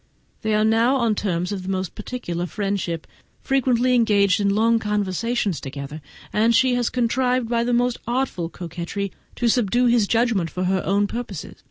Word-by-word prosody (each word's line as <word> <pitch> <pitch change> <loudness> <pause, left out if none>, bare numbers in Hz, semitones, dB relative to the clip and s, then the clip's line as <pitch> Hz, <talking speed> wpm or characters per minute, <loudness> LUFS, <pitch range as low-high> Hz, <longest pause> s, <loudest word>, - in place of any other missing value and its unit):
They 220 -1 0
are 215 0 +3
now 230 +4 +3
on 235 -4 +2
terms 180 -3 -1
of 200 -2 -3
the 185 - -6
most 190 -2 -2
particular 175 -9 -4
friendship, 195 -5 -2 0.4
frequently 255 -2 +2
engaged 205 -5 +3
in 200 - +2
long 230 +2 +3
conversations 210 -1 -1
together; 140 +3 -7 0.3
and 225 +2 +3
she 255 +2 +4
has 245 -1 +1
contrived 250 0 +1
by 235 0 +1
the 245 - -1
most 245 0 +1
artful 240 -9 -1
coquetry 175 +3 -5 0.2
to 240 - 0
subdue 240 +1 +2
his 235 -4 +3
judgment 225 -7 +1
to 180 - -1
her 190 0 +1
own 200 +1 +2
purposes. 210 -5 -6
215 Hz, 170 wpm, -22 LUFS, 190-240 Hz, 0.4 s, she